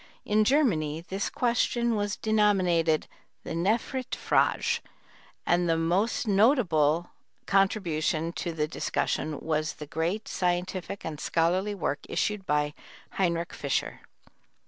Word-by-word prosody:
In 215 +1 +3
Germany 170 - +1
this 195 +1 -2
question 235 -1 +1
was 205 0 -1
denominated 185 -7 +2 0.4
the - - -7
Nephritfrage, 225 +9 +1 0.7
and 175 0 +2
the 165 - +3
most 185 +9 0
notable 180 - +3 0.3
contribution 170 -5 +1
to 175 - -3
the 155 -2 -1
discussion 155 -1 -2
was 155 0 -1
the 150 - -8
great 165 +7 -2
scientific 180 +1 -2
and 155 -2 -5
scholarly 185 +7 +1
work 150 -6 -2
issued 210 -3 -1
by 150 0 +1 0.4
Heinrich 170 -3 -1
Fischer. 140 -2 -2
175 Hz, 110 wpm, -28 LUFS, 160-210 Hz, 0.7 s, In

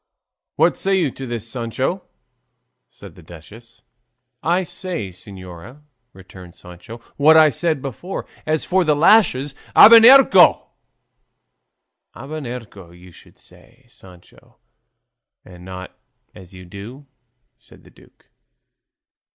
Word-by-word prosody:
"What 165 +3 +1
say 195 0 -2
you 155 -7 -1
to 135 +1 -10
this, 115 -2 -6
Sancho?" 130 - -4 0.9
said 100 -4 -15
the 90 - -18
duchess. 95 +9 -16 0.6
"I 175 +3 -1
say, 175 - -7
señora," 95 - -14 0.3
returned 95 -3 -16
Sancho, 90 +6 -13 0.2
"what 155 +3 +4
I 155 -1 +5
said 155 -1 -2
before; 140 - -8 0.2
as 155 0 -2
for 185 0 0
the 155 -3 0
lashes, 150 -5 +2 0.2
abernuncio!" 230 -3 +6 1.4
"Abrenuncio, 125 - -10
you 90 +1 -18
should - - -21
say, - - -20
Sancho, 90 -2 -21 0.9
and 90 -1 -16
not 95 0 -11 0.4
as 95 -3 -16
you 95 -1 -14
do," 105 +10 -12 0.5
said - - -22
the - - -21
duke. - - -25
120 Hz, 110 wpm, -18 LUFS, -, 1.4 s, abernuncio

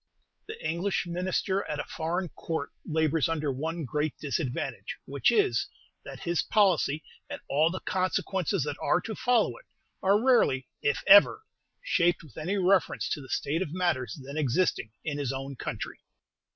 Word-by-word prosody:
The 440 +1 -7
English 175 +4 -1
Minister 185 +3 -1
at 150 - -4
a - - -1
Foreign 170 +3 -3
Court 160 -2 -4
labors 160 -1 +1
under 155 -3 -1
one 160 +4 -3
great 150 +3 -2
disadvantage, 140 -3 -3
which - - +2
is, 410 -2 +2 0.4
that - - -9
his 170 -2 0
policy, 175 -8 +2 0.3
and - - -5
all 155 +4 +3
the 185 +2 -5
consequences 185 -1 0
that 145 0 -4
are 175 - +3
to 225 - -5
follow 225 - +2
it, - - -17 0.4
are 200 +2 +4
rarely, 230 - +3
if 140 -1 0
ever, 205 - +7 0.4
shaped 175 - +2
with 150 -8 -16
any 180 +6 -2
reference 190 0 +2
to 150 - -2
the 130 - -12
state 155 +5 -1
of 165 -3 -3
matters 155 -9 -1
then 140 +3 -6
existing 150 -3 +1
in 145 -2 -3
his 140 -3 -1
own 135 +1 -5
country. - - -5
165 Hz, 165 wpm, -28 LUFS, 145-190 Hz, 0.4 s, ever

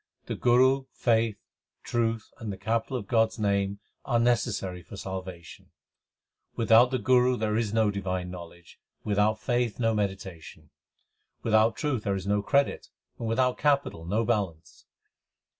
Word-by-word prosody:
The - - -4
Guru, 130 +2 +3
faith, 115 -2 +1 0.5
truth, 115 -2 -1
and 110 -3 -4
the 95 - -6
capital 115 +5 -1
of 115 - -6
God 110 +2 +3
s 110 - -13
name 100 -2 0 0.3
are 120 - +1
necessary 105 -6 0
for 100 - -11
salvation: 95 -3 -7 0.9
Without 115 +1 +5
the 130 - 0
Guru 125 +2 +3
there 110 -1 -1
is 110 -2 0
no 110 -1 +2
divine 95 -2 -3
knowledge, 85 -1 -11 0.2
without 105 +1 +1
faith 120 -1 -1
no 115 -2 +2
meditation; 95 -5 -5 0.7
Without 110 0 +3
truth 145 -7 -1
there 100 -2 -1
is 95 -1 -5
no 105 0 +1
credit, 140 +7 +1 0.3
and 115 - -3
without 125 +2 +1
capital 140 - +1
no 105 +7 0
balance. 95 -9 -3
110 Hz, 145 wpm, -27 LUFS, 100-120 Hz, 0.9 s, Without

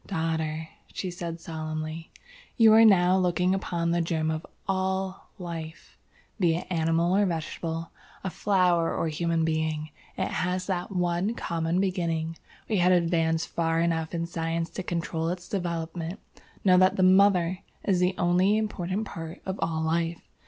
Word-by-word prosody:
"Daughter," 160 -3 -2 0.2
she 185 - -4
said, 170 -1 -5
solemnly, 155 0 -5 0.5
"you 225 -3 +7
are 225 +1 +8
now 185 -4 +6
looking 180 0 +2
upon 170 -3 -1
the 170 0 +2
germ 160 -1 0
of 155 +1 -3 0.2
all 190 0 -2
Life, 165 -3 -7 0.4
be 170 -4 +3
it 170 - -4
animal 165 +1 +2
or 205 - +4
vegetable, 165 0 -4 0.3
a 190 - -2
flower 180 -5 +2
or - - 0
a - - 0
human 165 +1 0
being, 155 -1 -1 0.3
it - - 0
has 180 0 -1
that 185 +2 -2
one 180 +4 0
common 165 -1 -1
beginning. 170 -4 -1 0.3
We 215 - +1
have 180 0 +4
advanced 165 -2 +2
far 165 -1 0
enough 165 -1 0
in 170 0 -1
Science 165 0 -2
to - - -4
control 165 -2 -2
its 180 0 -5
development. 170 0 -3 0.5
Know 180 -1 +6
that 185 0 +4
the 185 - +2
MOTHER 185 -1 +4 0.2
is 190 -3 +2
the 180 +1 +2
only 180 +4 +3
important 205 -1 -2
part 165 -3 -7
of 190 +1 -4
all 160 -1 -1
life. 165 +1 0
170 Hz, 160 wpm, -27 LUFS, 165-185 Hz, 0.5 s, are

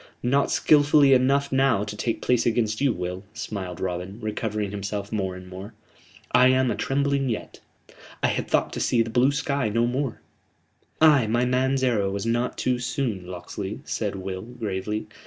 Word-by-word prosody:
"Not 140 +3 +2
skilfully 145 -2 +5
enough 140 +2 +3
now 135 -6 +3
to 105 0 -6
take 115 +2 -2
place 125 -2 +2
against 110 -1 0
you, 140 -2 +3
Will," 90 -1 -4
smiled 95 -5 -5
Robin, 90 +3 -4
recovering 105 -2 -3
himself 100 0 -4
more 95 -4 -2
and 90 0 -10
more. 95 +4 -9 0.6
"I 125 - +6
am 130 0 +3
atrembling 140 +3 0
yet. 110 - -5 0.6
I - - +4
had - - -2
thought - - +1
to - - -4
see 115 -2 +2
the 115 - -7
blue 125 +4 +4
sky 140 -4 -1
no 115 +3 +1
more 130 +1 -2 0.5
" - - -42
"Ay, 145 -7 +6
my 120 +3 +1
man's 130 +1 +1
arrow 110 -6 +2
was 100 +2 -3
not 120 +2 -1
too 125 -1 0
soon, 120 -7 -3
Locksley," 95 +3 -6
said 105 -3 -2
Will, 95 -1 -5
gravely. 110 -2 -4
115 Hz, 175 wpm, -25 LUFS, 100-130 Hz, 0.6 s, I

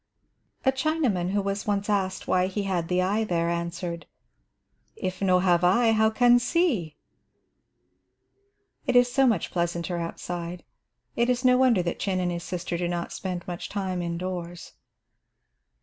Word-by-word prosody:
A 265 - +5
Chinaman 265 - 0
who 200 +1 0
was 200 +1 -3
once 205 -1 0
asked 190 -3 -1
why 185 0 +2
he 200 +2 -3
had 180 -4 -1
the 180 +1 +1
eye 205 +4 +1
there, 170 -4 0
answered, 170 0 -4 0.9
"If 185 0 -4
no 185 -2 +4
have 180 -1 +3
eye, 225 +6 +4
how 220 0 +4
can 245 +2 +5
see?" 240 - 0 1.9
It 255 - +1
is 245 0 +5
so 270 -1 +4
much 215 -9 0
pleasanter 170 0 -2
outside, 170 +1 -5 0.5
it 235 +1 +1
is 250 +1 0
no 250 0 +6
wonder 250 -7 +4
that 170 - -3
Chin 190 -2 -1
and 180 -1 0
his 170 0 -4
sister 175 -1 -4
do 175 - 0
not 175 0 -3
spend 180 -2 -5
much 175 -1 -5
time 190 -3 -2
indoors. 175 0 -5
185 Hz, 155 wpm, -26 LUFS, 175-220 Hz, 1.9 s, no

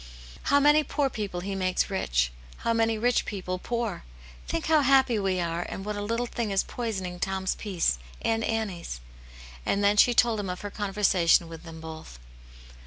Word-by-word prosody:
How 285 - +4
many 295 +2 +5
poor 285 -2 0
people 200 -5 -4
He 195 +2 -4
makes 185 0 0
rich; - - +1 0.3
how 230 - +3
many 225 -1 +2
rich 240 +2 +2
people 185 -2 -4
poor! 230 -4 -3 0.4
Think 65 - -2
how, 310 -1 +4
happy 265 -4 +4
we 190 -2 0
are, 170 0 -1
and 195 - -6
what 210 0 -3
a 205 - -3
little 230 +4 -1
thing 235 -2 -3
is 195 -1 +2
poisoning 190 -7 -4
Tom's 190 0 -1
peace, 175 - -1 0.2
and 225 0 0
Annie's." 200 - -3 0.6
And 200 - 0
then 205 +1 +4
she 245 +3 +6
told 230 -3 +4
him 200 -2 -3
of 180 - -4
her 205 -1 -5
conversation 195 -5 +2
with 165 +1 -10
them 165 -1 -9
both. 160 - -9
200 Hz, 180 wpm, -27 LUFS, 180-230 Hz, 0.6 s, she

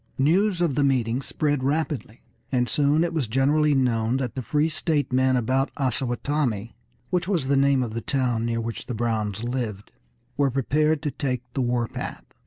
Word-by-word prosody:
News 175 +7 +2
of 170 -5 +2
the 145 - +1
meeting 125 -2 +1
spread 145 0 -1
rapidly, 140 -5 -2 0.3
and 125 -2 +1
soon 145 +6 +2
it 170 -1 -1
was 150 -7 0
generally 145 +5 +3
known 120 -2 +1
that 130 -3 -3
the 130 - -4
free 150 +6 +1
state 155 -3 -1
men 130 0 +3
about 130 +3 +1
Osawatomie, 125 -3 -1 0.4
which 180 -1 0
was 175 -9 0
the 140 +1 +2
name 135 -1 +3
of 115 -3 -5
the 115 - -3
town 125 -3 0
near 115 0 -1
which 115 0 -5
the 125 - -3
Browns 110 -2 -1
lived, 120 -5 -4 0.5
were 140 -1 +3
prepared 150 +4 +1
to 150 - -1
take 130 -3 -2
the 135 - -1
war 120 -1 0
path. - - -6
130 Hz, 185 wpm, -25 LUFS, 120-145 Hz, 0.5 s, generally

